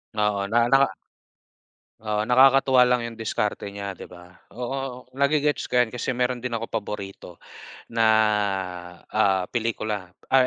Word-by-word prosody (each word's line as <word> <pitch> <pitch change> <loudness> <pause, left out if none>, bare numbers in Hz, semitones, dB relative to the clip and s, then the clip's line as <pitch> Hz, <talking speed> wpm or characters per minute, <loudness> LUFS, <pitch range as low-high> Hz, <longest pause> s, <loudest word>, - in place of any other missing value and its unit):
Oo, 105 -2 0
naka 115 +3 +2
naka 135 0 +4 1.1
Oo, 105 0 -1
nakakatuwa 130 0 +6
lang 125 -1 +1
yung 115 - -9
diskarte 105 -2 -3
niya, 100 -1 -6
'di - - -10
ba? 90 0 -14 0.2
Oo, 125 +2 -5
nage-gets 145 +1 +1
ko 125 - +3
'yan 120 - +4
kasi 125 +2 -3
meron 125 0 -1
din 125 - -3
akong 115 0 -3
paborito 100 -4 -6 0.5
na, 115 -1 +2 1.0
ah, 100 -3 +2
pelikula 110 -5 -3 0.2
ay 130 -1 +5
115 Hz, 140 wpm, -24 LUFS, 105-125 Hz, 1.1 s, nakakatuwa